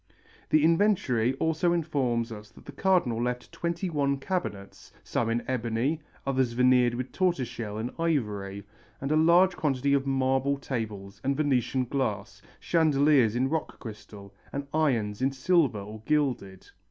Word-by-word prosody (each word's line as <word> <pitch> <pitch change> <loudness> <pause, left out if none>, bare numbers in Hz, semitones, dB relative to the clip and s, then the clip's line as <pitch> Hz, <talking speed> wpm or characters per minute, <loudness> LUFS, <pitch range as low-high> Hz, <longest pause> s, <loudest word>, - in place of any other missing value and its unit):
The 155 -1 +4
inventory 160 - +2
also 160 +4 +1
informs 130 -8 -1
us 105 -1 -9
that - - -17
the - - -8
Cardinal 140 -8 +1
left 125 0 -3
twenty 170 +2 -3
one 140 -4 0
cabinets, 135 - -5
some 115 - -1
in 115 +1 0
ebony, 125 +5 -1 0.2
others 130 -3 0
veneered 125 -1 +4
with 125 +1 -4
tortoise 175 -9 0
shell 110 -3 -6
and 115 +3 -3
ivory, 105 -11 -1 0.4
and 135 +2 -3
a - - +3
large 175 +4 +5
quantity 140 -3 0
of 140 -1 +1
marble 135 +1 +1
tables 110 -7 -5
and 135 +1 0
Venetian 130 -3 +1
glass, 110 -7 -3 0.2
chandeliers 145 -7 +3
in 130 +2 +1
rock 160 +3 -3
crystal, 105 -3 -10 0.2
and 140 0 -4
irons 120 -9 0
in 135 +1 +2
silver 140 - +2
or 105 +2 -8
gilded. 130 -11 -1
130 Hz, 150 wpm, -27 LUFS, 115-155 Hz, 0.4 s, large